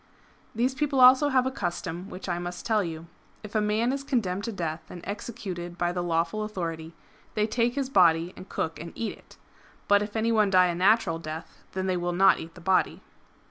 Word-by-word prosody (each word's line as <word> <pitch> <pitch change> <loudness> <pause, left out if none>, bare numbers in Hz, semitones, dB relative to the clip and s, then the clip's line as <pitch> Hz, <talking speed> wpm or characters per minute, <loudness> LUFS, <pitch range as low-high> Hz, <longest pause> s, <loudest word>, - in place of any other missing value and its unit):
] - - -32
These 250 +4 +1
people 275 0 0
also 260 +3 +7
have 260 -2 +3
a 260 - 0
custom 175 -3 -4
which 185 -1 -8
I 175 -1 -1
must 175 0 -6
tell 215 -3 +2
you. 165 -1 -6 0.4
If 210 - -9
a 215 - +2
man 215 +4 +1
is 275 0 -3
condemned 205 -8 -1
to 230 - -3
death 165 -5 -3
and 175 - -9
executed 195 -5 -6
by 175 0 0
the 175 0 -2
lawful 170 +4 0
authority, 165 -6 -5 0.4
they 210 -1 +2
take 235 +2 0
his 275 -2 -1
body 175 -7 +4
and 185 - -11
cook 160 -2 -3
and 170 +1 -8
eat 230 - -2
it. - - -20 0.5
But 205 0 +5
if 210 +1 -5
any 225 +1 +1
one 215 -3 +3
die 185 -1 +5
a - - 0
natural 185 -1 +3
death 160 0 -8
then 190 0 -2
they 185 -1 0
will 175 0 -2
not 190 0 +5
eat 165 +1 -9
the 180 - -12
body.'' 185 +2 +1
190 Hz, 220 wpm, -27 LUFS, 175-225 Hz, 0.5 s, also